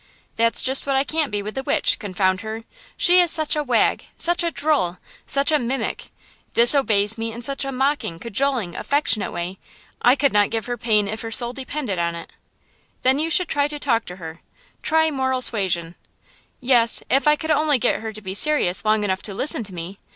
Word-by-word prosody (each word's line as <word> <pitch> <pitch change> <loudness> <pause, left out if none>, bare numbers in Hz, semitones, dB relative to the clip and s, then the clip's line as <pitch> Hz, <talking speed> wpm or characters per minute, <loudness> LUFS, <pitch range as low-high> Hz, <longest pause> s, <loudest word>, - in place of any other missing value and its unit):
"That's 230 0 +1
just 265 +2 +2
what 275 - 0
I 270 - +2
can't 310 0 -1
be 205 -1 -3
with 210 +1 -6
the 265 - -4
witch, - - +1
confound 185 -2 -1
her! 220 0 -7 0.3
she 355 +1 +5
is 350 -1 +4
such 315 -2 +2
a 300 - 0
wag, 245 -5 0
such 345 0 +2
a 340 - 0
drole, 285 - -1 0.3
such 280 +3 +1
a 305 - +3
mimic; 250 +3 -3 0.5
disobeys 230 -4 +4
me 225 0 -3
in 235 +2 -9
such 275 +3 0
a 275 - -4
mocking, 270 - -1
cajoling, 235 -1 -1
affectionate 280 -7 0
way. 175 +2 -6 0.4
I 245 +2 +5
could 280 -3 +1
not 205 -1 +3
give 225 -2 -3
her 245 - -3
pain 215 -4 +1
if 220 +2 -5
her 225 - -6
soul 240 +1 +3
depended 260 -7 -4
on 170 0 -1
it!" 170 - -10 0.7
"Then 265 +2 +2
you 320 +2 0
should 355 +1 +1
talk 285 -5 0
to 180 - -8
her; 165 -2 -10 0.4
try 320 0 +2
moral 260 -2 -1
suasion." 175 -7 0 0.7
"Yes; 245 -2 +2
if 275 +3 +2
I 300 - +6
could 315 +1 -4
only 300 -1 +2
get 235 - 0
her 220 0 -6
to 215 0 -9
be 190 -1 -5
serious 205 -6 +3
long 215 -1 +1
enough 190 -2 -2
to 200 - -7
listen 245 0 +1
to 200 - -6
me! 175 +4 -7
235 Hz, 200 wpm, -21 LUFS, 205-280 Hz, 0.7 s, I